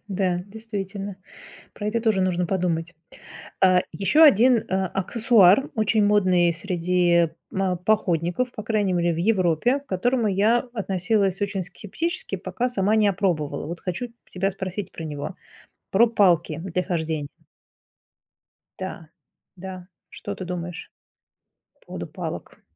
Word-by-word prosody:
Да, 185 -2 0
действительно, 200 -2 -6 0.6
про 205 - -6
это 230 +2 0
тоже 220 -4 +2
нужно 180 -1 +1
подумать. 165 -3 -1 0.7
А, 185 -1 +6
еще 200 - +3
один, 245 -4 +6
а, 190 0 0
аксессуар 210 +3 +4
очень 215 -1 +2
модный 185 -4 +3
среди 175 -1 +1 0.2
ма 190 -1 0
походников, 180 +3 0
по 215 - -7
крайней 210 -3 0
мере 175 -1 +1
в - - -6
Европе, 190 - +2
к 285 - -26
которому 230 +4 +1
я 210 +5 +3 0.2
относилась 195 -1 0
очень 200 -2 -1
скептически, 260 - -4
пока 250 +1 -2
сама 210 -2 +1
не 210 -2 +4
опробовала. 175 -8 -1
Вот 170 +1 -6
хочу 190 +7 -4 0.2
тебя 195 +2 -1
спросить 190 +1 -5
про 165 - -7
него, 150 +3 -5 0.6
про 230 +5 +5
палки 180 -9 +2
для 180 0 -2
хождень 160 -4 -2 1.5
Да, 180 -4 -7 0.5
да, 185 0 -8 0.2
что - - -7
ты 185 - -7
думаешь 175 -1 -6 0.8
по - - -31
поводу - - -6
палок? - - -7
190 Hz, 130 wpm, -24 LUFS, 175-215 Hz, 1.5 s, А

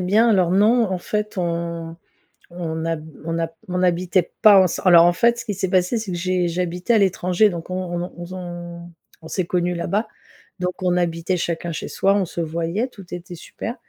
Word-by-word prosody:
bien. 210 +6 +3
Alors, 185 -4 +3
non, 220 +5 +4
en 185 - 0
fait, 210 +3 -3
on 170 -1 -3 0.6
on 165 -2 -4
hab 160 -1 -3 0.2
on 165 0 -2
a 165 - 0
p 165 - -22 0.2
on 180 0 -1
habitait 180 0 +1
pas 205 -3 +8
ensem 180 - 0
alors, 170 -1 +8
en 175 - +4
fait, 235 +6 +2
ce - - -7
qui 210 - -2
s'est 190 -1 -2
passé 185 +5 +2
c'est 215 -4 -4
que 175 - -3
j'ai 180 0 0
j'habitais 180 +5 -1
à - - +6
l'étranger. 190 +1 +3
Donc 170 -2 -7
on 185 - -3 0.2
on - - -1
n'ont 175 - -5
on 175 - -6
zon 175 -1 -8 0.3
on 160 - -10
s'est 185 - -1
connu 180 0 0
là-bas 200 +6 -1 0.5
donc 180 0 -1
on 180 0 +2
habitait 170 +1 0
chacun 170 0 -3
chez - - -5
soi, 195 +1 +2
on 195 - +1
se 170 0 -5
voyait, 170 +9 -2
tout 195 -6 -13
était 175 0 -9
super. 230 +7 -7
180 Hz, 215 wpm, -22 LUFS, 170-190 Hz, 0.6 s, pas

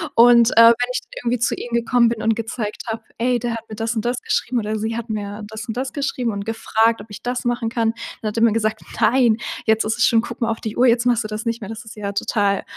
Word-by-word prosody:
Und, 235 0 +7
äh, - - -4
wenn 230 0 +9
dann - - -7 0.2
ich 250 - -1 0.2
irgendwie 245 0 0
zu 235 - +1
ihm 240 - -7
gekommen 235 0 +3
bin 225 -2 -3
und 225 0 +2
gezeigt 225 -1 -4
habe: 225 0 -4
„Ey, 245 +1 +1
der 240 0 -2
hat 230 0 -7
mir 215 - -7
das 225 +2 -2
und 220 - -2
das 245 +1 -1
geschrieben. 250 -1 0
Oder 215 0 -2
sie 220 +2 -2
hat 235 0 -6
mir 210 0 -4
das 220 +3 -8
und 225 - -4
das 260 +1 -2
geschrieben 260 -4 -1
und 200 -1 -5
gefragt, 225 0 +1
ob 210 - -12
ich 205 - -9
das 245 0 -3
machen 240 -1 0
kann.“ 225 -1 0 0.3
Dann 215 - -1
hat 210 - -7
er 225 - +3
mir 230 -2 +5
gesagt: 215 -1 -1 0.2
„Nein, 230 0 +4 0.3
jetzt 220 0 +3
ist 220 +2 -1
es 245 - +4
schon 225 -2 +4
guck 235 - -8
mal 230 - +1
auf 225 - -4
die 220 -1 -5
Uhr, 250 - +5
jetzt 235 +1 +3
machst 240 -2 +2
du - - -4
das 215 +1 -5
nicht 230 0 -2
mehr. 200 - -7
Das 225 0 -8
ist 220 - -11
ja 205 -2 -4
total, 200 0 0
230 Hz, 285 wpm, -21 LUFS, 220-240 Hz, 0.3 s, wenn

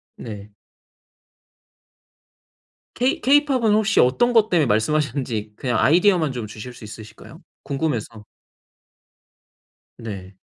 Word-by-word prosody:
네. 105 -2 -9 2.5
케이 250 +3 0
케이팝은 270 -6 +3
혹시 215 0 +2
어떤 240 - +3
것 220 -1 +4
때문에 165 -4 +2
말씀하셨는지 120 -2 -1
그냥 125 0 -2
아이디어만 175 -2 +3
좀 120 -4 -5
주실 110 +4 -9
수 115 - -14
있으실까요? 110 0 -12 0.2
궁금해서. 120 -7 -3 1.7
네. 95 -4 -8
130 Hz, 240 characters per minute, -21 LUFS, -, 2.5 s, 것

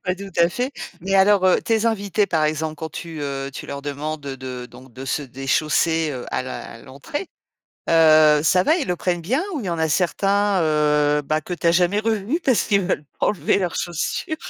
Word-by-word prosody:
Pas 180 0 -1
tout 195 0 -9
à 170 0 +5
fait, 250 +9 -3 0.3
mais 195 +3 -2
alors, 195 0 +5
heu, 185 - +3
tes 225 0 +1
invités, 205 -2 0
par 160 -4 0
exemple, 155 0 -1
quand 160 +1 -6
tu, 165 -2 -7
heu, 140 -1 -4
tu - - -7
leur 140 0 -6
demandes 145 +2 -4
de 130 -2 -6
donc 125 +1 -15
de 130 +2 -8
se 145 - -2
déchausser, 155 +5 0
heu, 125 -3 -6
a - - 0
la 130 - -6
à 115 - -12
l'entrée, 140 - -7 0.6
heu, 155 -2 +6
ça 180 +3 +4
va, 315 - +3
ils 305 - -2
le 180 - 0
prennent 175 0 -1
bien 255 - 0
ou 315 - -3
il 225 - -5
y - - -2
en 170 -1 -2
a 160 - +1
certains, 195 +4 +1
heu, 150 -1 +2
bah, 155 +2 -1
que 180 +3 -5
tu 170 - -4
as 170 - +5
jamais 180 +3 +2
revus 220 - 0
parce 260 -4 +3
qu'ils 200 -2 +3
ne - - -3
veulent 150 - -1
pas - - +1
enlever 200 - +1
leurs 180 -3 -2
chaussures? 175 - -3
165 Hz, 230 wpm, -22 LUFS, 150-195 Hz, 0.6 s, heu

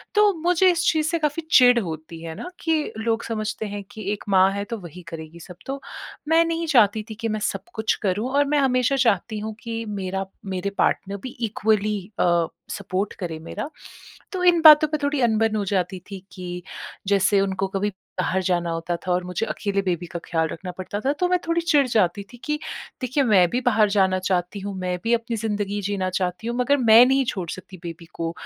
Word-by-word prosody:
तो 420 -1 +5
मुझे 360 +1 +4
इस 345 0 0
चीज़ 315 -1 0
से 335 0 0
काफ़ी 300 +1 -1
चिड़ 245 -1 +7
होती 165 -3 -6
है 160 -1 -6
ना 360 - -7
कि 320 -2 0
लोग 225 +1 -1
समझते 215 -1 -3
हैं 205 0 -5
कि 215 - -8
एक 205 - -7
माँ 190 0 +5
है 200 - -2
तो 230 0 -5
वही 180 0 -10
करेगी 160 0 -9
सब। 180 +1 -11
तो 275 +1 -4 0.5
मैं 330 +1 +5
नहीं 330 0 -2
चाहती 220 -6 +4
थी 220 - -6
कि 230 - 0
मैं 215 0 -1
सब - - -2
कुछ 220 -1 +1
करूँ। 205 +6 0
और 285 +1 +3
मैं 295 0 +2
हमेशा 255 0 +2
चाहती 220 -3 +1
हूँ 215 0 -5
कि 230 -1 -4
मेरा 195 -1 -3 0.3
मेरे 185 +2 -2
पार्टनर 200 +1 +1
भी 255 - -5 0.2
इक्वली 210 0 +1 0.2
अ, 170 -2 +3 0.2
सपोर्ट 195 0 -3
करे 165 -4 -4
मेरा। 210 - -6 0.6
तो 365 -1 -3
इन 345 -2 +5
बातों 310 -1 +9
पे 305 - -1
थोड़ी 285 -1 0
अनबन 225 -2 +2
हो 210 - 0
जाती 185 -1 -1
थी 195 - -5
कि 180 -1 -6 0.5
जैसे 200 0 +3
उनको 195 0 -1
कभी 195 +2 -1 0.3
बाहर 185 +1 +1
जाना 175 -1 0
होता 165 +1 -2
था - - +1
और 180 0 +1
मुझे 180 +5 -2
अकेले 200 -1 -1
बेबी 175 -2 -2
का 170 - -6
ख्याल 160 -1 0
रखना 180 +2 -6
पड़ता 195 +2 -4
था 275 +2 +1
तो 360 - +2
मैं 360 -1 +3
थोड़ी 335 0 +1
चिढ़ 295 -5 +3
जाती 200 -4 +1
थी - - -11
कि 300 0 -1 0.4
देखिए 255 +3 +1
मैं 195 -6 +5
भी 250 +2 -1
बाहर 220 -4 +3
जाना 190 -2 +2
चाहती 185 +1 -1
हूँ, 200 0 -5
मैं 180 -1 -2
भी 230 - +2
अपनी 230 0 -3
ज़िंदगी 205 -2 -2
जीना 190 -2 -1
चाहती 185 +3 -2
हूँ 235 - -2
मगर 280 +3 +3
मैं 230 -1 +7
नहीं 270 +1 +3
छोड़ 185 -7 -3
सकती 185 0 -9
बेबी 170 0 -7
को 165 0 -3
210 Hz, 215 wpm, -23 LUFS, 185-255 Hz, 0.6 s, बातों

